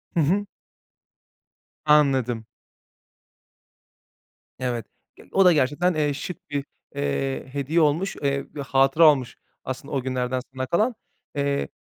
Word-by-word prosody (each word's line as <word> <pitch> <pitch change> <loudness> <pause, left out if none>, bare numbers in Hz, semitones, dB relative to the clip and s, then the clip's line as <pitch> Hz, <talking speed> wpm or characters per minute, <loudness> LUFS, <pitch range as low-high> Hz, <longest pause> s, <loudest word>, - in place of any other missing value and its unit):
Hı - - +3
hı. 185 +7 +2 1.4
Anladım. 135 -7 +3 2.1
Evet, 120 -2 -2 0.3
ge - - -16
o 195 -1 +4
da 180 - +7
gerçekten, 150 +6 +2
eee, 150 -2 +1
şık 150 +2 -7
bir, 140 -1 -2 0.3
eee, 70 - -1
hediye 145 +4 +1
olmuş. 160 +6 +1
Eee, 140 0 0
bir 145 - -4
hatıra 135 +4 +5
olmuş 130 -4 -3 0.3
aslında 130 +2 -6
o 135 - 0
günlerden 130 0 -1
sana 130 0 -2
kalan. 215 - +1 0.4
Eee, 140 0 0
140 Hz, 120 wpm, -24 LUFS, 130-155 Hz, 2.1 s, da